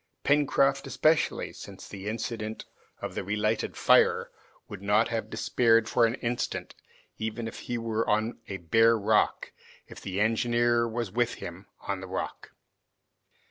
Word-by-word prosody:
Pencroft 140 -1 +2
especially, 155 0 +1
since - - -10
the 100 0 -8
incident 110 0 -4 0.4
of - - -4
the - - -3
relighted 105 +2 -1
fire, - - +4 0.4
would - - -9
not 105 +3 +2
have 115 -1 -3
despaired 115 -2 +2
for 115 0 +4
an 115 - -2
instant, 120 -2 -3 0.5
even 110 +1 -3
if - - -8
he 120 - -4
was 115 -1 -1
on 110 +2 0
a 95 - -4
bare 115 +7 +4
rock, 105 +1 +1 0.3
if - - -12
the 95 0 -4
engineer 120 +2 +2
was 115 -3 -3
with 120 +3 0
him 95 0 -9
on 100 -1 -3
the 95 - -7
rock. 95 +1 -5
115 Hz, 145 wpm, -28 LUFS, 105-120 Hz, 0.5 s, fire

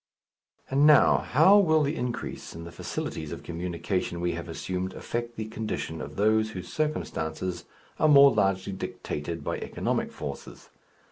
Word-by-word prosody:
And 140 +2 +5
now, 150 -3 +6
how 185 +10 +5
will 160 -5 +4
the 145 +2 -1
increase 125 -4 -5
in 85 - -7
the 85 - -9
facilities - - -5
of - - -7
communication 85 +1 -3
we 85 0 0
have - - -6
assumed 95 0 -3
affect 120 0 -4
the 110 - -4
condition 110 -7 -4
of - - -7
those 110 +1 +2
whose 90 -4 -8
circumstances 90 - -2 0.3
are 155 - +4
more 140 -1 +8
largely 95 -2 +1
dictated 85 -3 -5
by - - -2
economic - - -2
forces? - - -8
105 Hz, 150 wpm, -27 LUFS, 90-140 Hz, 0.3 s, more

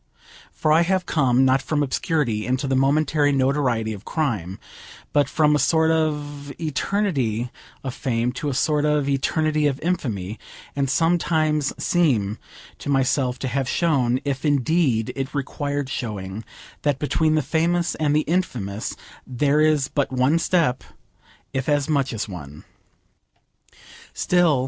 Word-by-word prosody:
For 155 - 0
I 160 - +5
have 185 +1 +1
come, 130 -4 +3
not 130 0 +3
from 150 +1 0
obscurity 140 - -1
into 130 +3 0
the 135 -1 0
momentary 145 +2 +2
notoriety 130 -5 +1
of 100 0 -9
crime, 110 - -2 0.6
but 145 -2 +3
from 150 -1 +3
a - - +2
sort 160 +1 +3
of 145 -3 -2
eternity 140 - -1 0.3
of 130 -2 -4
fame 120 -3 -1
to 150 +3 -3
a 135 - -2
sort 150 +2 +1
of 150 -2 +1
eternity 150 +2 +1
of 140 -1 -2
infamy, 110 - -2 0.4
and 140 -1 0
sometimes 155 -1 +1
seem 120 - +1 0.4
to - - -6
myself 130 -2 +1
to 135 - -4
have 130 +1 -1
shown, 130 -7 +1
if 135 -1 -2
indeed 145 -5 +1
it 135 +2 -4
required 145 0 -2
showing, 105 -5 -5 0.4
that 145 -3 +1
between 155 +2 +1
the 155 - +1
famous 170 +3 +1
and 150 -2 0
the 155 - +4
infamous 125 - -2 0.3
there 140 +4 +2
is 155 -3 +3
but 140 -2 -1
one 130 +5 +2
step, 165 -7 +1 0.7
if 130 0 -2
as 145 -2 +2
much 140 -4 +1
as 110 -2 -3
one. 75 -6 -9
140 Hz, 140 wpm, -23 LUFS, 125-155 Hz, 0.7 s, I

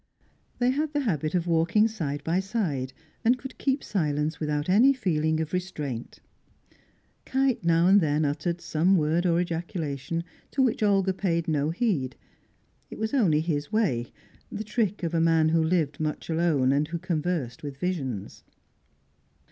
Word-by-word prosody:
They 245 +1 +2
had 300 +3 -1
the 290 - +1
habit 160 - -1
of 175 -2 +1
walking 170 +6 +3
side 150 -10 -4
by 170 +3 +1
side, 185 - -2 0.3
and 245 +3 +4
could 265 +1 -10
keep 270 0 0
silence 155 -3 -1
without 150 -1 -1
any 230 +9 +5
feeling 160 - 0
of 160 +1 -3
restraint. 150 -10 -4 1.0
Kite 265 -5 0
now 170 0 +3
and 195 +2 +6
then 150 -1 +1
uttered 160 +4 -2
some 175 +3 +2
word 165 +3 +1
or 170 0 +3
ejaculation, 165 -3 -3 0.3
to 270 - +1
which 245 -4 +1
Olga 195 -2 +3
paid 170 -3 -1
no 150 -2 +1
heed; 165 - -1 0.7
it - - -9
was 220 +3 -2
only 180 - +3
his 150 -3 -2
way, 150 - 0 0.4
the 210 - -4
trick 210 -3 -1
of 170 0 -2
a 165 - +2
man 165 -1 +4
who 165 0 +3
lived 160 -4 0
much 155 +1 -3
alone, 160 -6 +2
and 145 +2 +1
who 170 +2 -3
conversed 160 -7 -2
with 145 -2 -7
visions. 135 - -4
165 Hz, 160 wpm, -27 LUFS, 150-195 Hz, 1.0 s, and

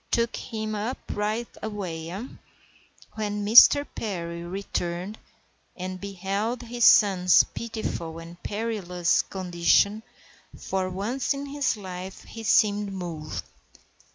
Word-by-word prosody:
Took 235 0 +1
him 215 -1 -4
up 215 +5 -2 0.2
right 215 +3 -1
away, 180 -7 -5
eh?" 195 +7 -5 0.9
When 210 -1 -3
Mr. 245 +6 +8
Perry 170 -5 -4
returned, 180 +1 -4 0.6
and 185 0 -6
beheld 200 +5 -3
his 240 0 0
son's 185 -4 +6
pitiful 215 -8 -5
and 170 +1 -11
perilous 205 -5 0
condition, 185 +3 +2 0.6
for 190 -1 -2
once 225 +9 -1
in 280 +1 -5
his 280 -4 -1
life 185 -1 -7
he 225 - -9
seemed 210 -2 +3
moved. 170 -5 -5
200 Hz, 110 wpm, -26 LUFS, 180-220 Hz, 0.9 s, Mr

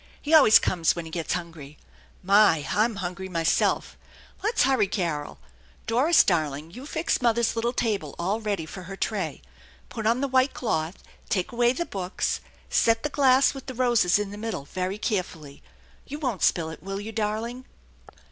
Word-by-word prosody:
He 300 - -3
always 220 -9 +8
comes 170 -3 +1
when 170 -1 -5
he 160 - -9
gets 165 -1 -2
hungry. 165 -5 -7 0.5
My! 195 -6 +4
I'm 220 +2 +1
hungry 190 0 -5
myself! 165 -2 0 0.4
Let's 430 - +2
hurry, 260 -5 +3
Carol. 170 -7 -3 0.5
Doris, 270 +9 +4
darling, 155 -3 -1
you 255 +9 -10
fix 320 -1 -1
mother's 235 -1 +2
little 230 +1 0
table 205 - -2
all 195 +6 -1
ready 205 -6 -2
for 185 +4 -9
her 195 - -6
tray. 195 -7 -3 0.5
Put 220 -1 -3
on 235 +2 +2
the 280 - 0
white 260 +1 +2
cloth, 165 -7 -2 0.3
take 185 -3 -1
away 240 0 +3
the 345 +6 -3
books, 190 - -3 0.3
set 225 0 +2
the 300 - -1
glass 270 -2 +4
with 270 -1 -10
the 260 - -6
roses 235 -8 +3
in 205 -1 -3
the 205 - -8
middle 220 -11 -4
very 185 +5 -3
carefully. 175 - -4 0.5
You 290 - -6
won't 255 - -3
spill 160 -2 +1
it, 160 - -11
will 195 +3 -5
you, 215 +2 -6
darling 225 +3 -3
210 Hz, 175 wpm, -25 LUFS, 175-240 Hz, 0.5 s, always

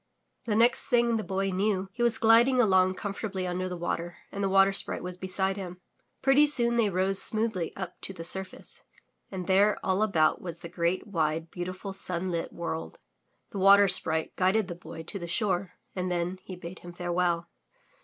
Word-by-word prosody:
The 215 -3 0
next 235 +3 +3
thing 240 -3 +3
the 215 - -3
Boy 195 0 -1
knew 195 0 0
he 240 - -7
was 240 0 +2
gliding 240 +2 +5
along 185 -4 +4
comfort 200 +1 -5
ably 185 -1 -2
under 185 +1 -2
the 180 - -5
water 175 0 -3
and 200 - -4
the 195 - +1
Water 195 0 +5
Sprite - - 0
was 180 0 -5
beside 190 +1 -2
him. 180 -2 -7 0.4
Pretty 275 +2 +5
soon 235 -5 +3
they 230 -3 +3
rose 190 +1 +2
smoothly 215 -6 +1
up 185 -2 -7
to - - -3
the 175 -3 -8
surface, 190 +2 -2 0.5
and 185 -2 -5
there 200 +3 +3
all 190 +2 +1
about 165 -8 +2
was 170 -2 -6
the 170 - -8
great, 170 +1 -1
wide, 165 -4 -1
beautiful, 185 +2 -5
sunlit 180 -2 -3
world. 165 -1 -5 0.5
The 200 - -5
Water 200 +1 +7
Sprite 160 -3 0
guided 190 +2 +2
the - - -3
Boy 165 -1 -10
to 195 +5 -6
the 170 - -6
shore 185 -1 -1 0.2
and 180 -1 -2
then 175 +1 -2
he 185 - -7
bade 175 0 -9
him 175 0 -11
farewell. 175 -1 -1
185 Hz, 190 wpm, -28 LUFS, 175-205 Hz, 0.5 s, Water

